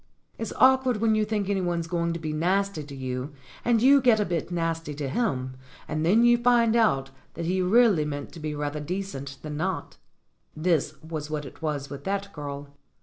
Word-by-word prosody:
It's 225 - -3
awkward 260 -2 +5
when 220 +1 +2
you 215 0 +2
think 210 -2 -1
anyone's 175 -4 0
going 170 0 -1
to 170 - -4
be 155 -1 -4
nasty 185 +1 0
to 140 -1 -10
you 130 +2 -4 0.3
and 235 -1 +2
you 275 +1 +7
get 240 -4 +4
a 210 - +2
bit 170 -3 -2
nasty 165 -3 -2
to 145 -1 -3
him, 130 - -1 0.3
and 155 +1 -2
then 205 +8 +4
you 240 0 +5
find 235 -2 +4
out 135 - +2 0.2
that 170 - -4
he 185 +2 +1
really 200 -3 +4
meant 145 -1 -5
to 170 - -10
be 155 -1 -4
rather 145 0 -3
decent 150 -4 -5
than 150 -1 -5
not. 155 - -3 0.6
This 160 -2 0
was 155 -2 -5
what 150 -1 -3
it 135 - -12
was 145 -3 -3
with 140 0 -7
that 200 0 -2
girl. 145 -1 -6
170 Hz, 200 wpm, -26 LUFS, 150-210 Hz, 0.6 s, you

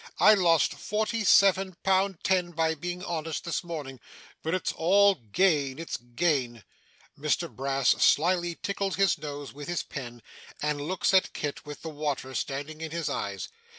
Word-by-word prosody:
I 215 - +8
lost 170 -5 +3
forty 220 +2 -2
seven 195 -1 +4
pound 190 -1 +1
ten 180 -2 +1
by 160 0 +1
being 175 +3 -5
honest 160 -3 -3
this 170 - -2
morning. 150 -7 -6 0.4
But 160 +3 -1
it's 185 - -1
all 200 +4 +4
gain, 140 - +1
it's 165 +1 -4
gain!' 120 -2 -1 0.5
Mr - - 0
Brass 135 -1 0
slyly 175 +2 +3
tickles 200 -1 -1
his 195 -3 +2
nose 145 -2 -7
with 145 +1 -9
his 175 -2 -2
pen, 120 -4 -8 0.4
and 150 -1 -1
looks 180 +6 0
at 190 - +3
Kit 145 0 -5
with 150 - -8
the 165 - -4
water 145 -3 -3
standing 145 +4 -4
in 160 - -4
his 165 0 -3
eyes. 100 -2 -3
160 Hz, 160 wpm, -28 LUFS, 145-185 Hz, 0.5 s, I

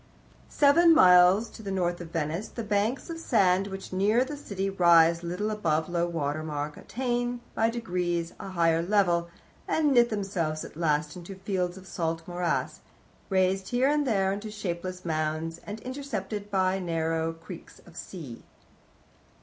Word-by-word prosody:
"Seven 325 +3 +5
miles 180 +1 +6
to - - -11
the 200 - -6
north 175 -2 -1
of 170 - -8
Venice 165 +4 -2
the 230 - -6
banks 215 - -1
of 330 - -6
sand 195 - +2
which 195 -1 -8
nearer 210 +6 +3
the 290 +3 -6
city 200 -9 -4
rise 170 -3 +5
little 180 +5 -2
above 160 -7 0
low 175 0 0
water 155 -3 -2
mark 150 -1 -4
attain 245 0 -2
by 225 +1 +2
degrees 175 -7 -2
a 195 - -7
higher 165 -3 +2
level, 175 -2 +2 0.4
and 305 -2 +2
knit 240 -2 +5
themselves 190 -8 -2
at - - -12
last 150 -1 0
into 180 +2 -9
fields 185 -2 -2
of 190 - -12
salt 165 -3 -3
morass, 175 -1 -2 0.5
raised 190 0 +1
here 250 +2 +2
and 295 -1 +1
there 195 -4 +2
into 205 +2 -5
shapeless 185 -3 -5
mounds, 160 +1 -2
and 210 +2 -5
intercepted 215 -6 -5
by 190 -1 +1
narrow 165 -2 -1
creeks 165 +1 -11
of 175 - -16
sea." 155 -11 -8
185 Hz, 160 wpm, -27 LUFS, 170-210 Hz, 0.5 s, miles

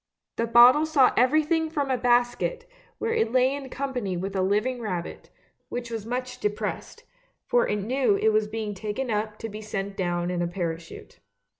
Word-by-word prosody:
The 230 - 0
bottle 245 +7 +7
saw 285 -5 +4
everything 310 +5 +2
from 285 -4 -1
a - - +3
basket, 245 - +1 0.3
where 455 0 -1
it 225 - +1
lay 255 +1 +3
in 280 -2 -6
company 250 -9 -3
with 195 +2 -4
a 190 - +1
living 210 +6 0
rabbit, 180 -6 -5 0.4
which 240 -1 -5
was 225 -2 -5
much 250 +1 -4
depressed, 210 -2 -4 0.4
for - - +2
it - - 0
knew 225 +2 +1
it 220 - +3
was 215 -1 +2
being 215 -1 -4
taken 215 +5 -4
up 215 0 -2
to 225 - -5
be 215 0 -8
sent 200 -2 -4
down 175 -1 -1
in 175 -1 -2
a 175 - 0
parachute. 170 -2 -6
230 Hz, 180 wpm, -26 LUFS, 205-260 Hz, 0.4 s, bottle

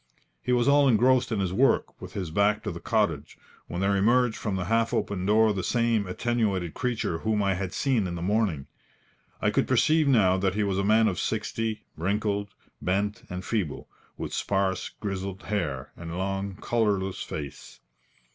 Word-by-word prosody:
He 125 - -2
was 120 -1 +3
all 140 0 +5
engrossed 125 +1 +4
in 110 - 0
his 95 -2 -1
work, 135 +7 +2
with - - -9
his 90 -5 -4
back 105 +4 +2
to 105 - -3
the 85 - -7
cottage, 85 -11 -1 0.3
when 85 - -4
there 100 +1 +2
emerged 120 +4 +3
from 105 -3 -3
the 95 -2 -2
half 115 +3 +1
open 95 -2 -2
door 110 +1 +4
the 95 - -2
same 115 +1 +1
attenuated 100 -4 -1
creature 120 -9 -2
whom 110 0 0
I 100 -1 +2
had 95 0 -3
seen 115 -2 +1
in 85 - -4
the 85 - -5
morning. 95 -8 0 0.8
I - - +3
could - - +1
perceive 155 -1 +3
now 100 -9 +4
that 95 0 0
he 105 - +1
was 100 -1 0
a - - +1
man 110 +2 +4
of 95 -5 -1
sixty, 110 0 -2
wrinkled, 100 +3 -1 0.3
bent, 100 +4 -1
and 90 +1 -5
feeble, 95 -11 -2 0.3
with - - -5
sparse, 95 -1 0
grizzled 95 -2 -5
hair, 85 -11 -3
and 85 0 -7
long, 95 +1 -2
colourless 100 -4 0
face. 70 -3 -7
100 Hz, 180 wpm, -27 LUFS, 95-110 Hz, 0.8 s, all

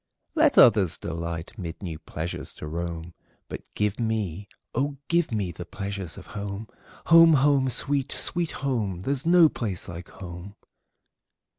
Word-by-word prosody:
Let 310 -3 +3
others 100 -7 +6
delight 85 +4 -5
mid 85 +1 -6
new 80 -4 -5
pleasures 80 +1 -5
to - - -8
roam, 85 +1 -5 0.3
But - - -6
give 105 +1 0
me, 105 -5 -2 0.3
oh, 140 +3 -1
give 170 -3 +2
me, 100 -5 -1
the 85 +1 -7
pleasures 95 -4 -5
of - - -10
home! 100 +1 -5 0.4
Home! 165 -1 +8
home! 140 -2 +3
sweet, 140 +2 +1
sweet 170 -2 +1 0.2
home! 105 -9 -1
There 135 - 0
's 140 +3 -3
no 175 -1 +7
place 105 - -4
like 85 0 -8
home! 95 +1 -9
100 Hz, 150 wpm, -26 LUFS, 85-135 Hz, 0.4 s, Home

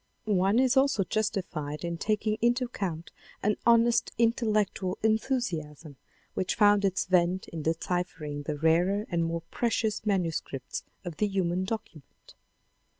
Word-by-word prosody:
One 195 0 +2
is 260 +1 +3
also 265 -6 +3
justified 175 -7 -2
in 170 -1 -3
taking 215 +1 0
into 240 +2 +2
account 180 -9 -5 0.3
an 210 0 +2
honest 235 0 +4
intellectual 215 -5 +1
enthusiasm 180 - -1 0.4
which 185 - -1
found 205 -1 +5
its 190 -2 +1
vent 180 0 +2
in 165 - -5
deciphering 160 -2 -2
the 150 -2 -2
rarer 175 +7 +2
and 170 -1 +1
more 165 0 -2
precious 225 -3 0
manuscripts 165 - -2 0.2
of 170 -3 -6
the 210 - +2
"human 185 -2 0
document." 190 -8 -8
190 Hz, 130 wpm, -28 LUFS, 165-220 Hz, 0.4 s, found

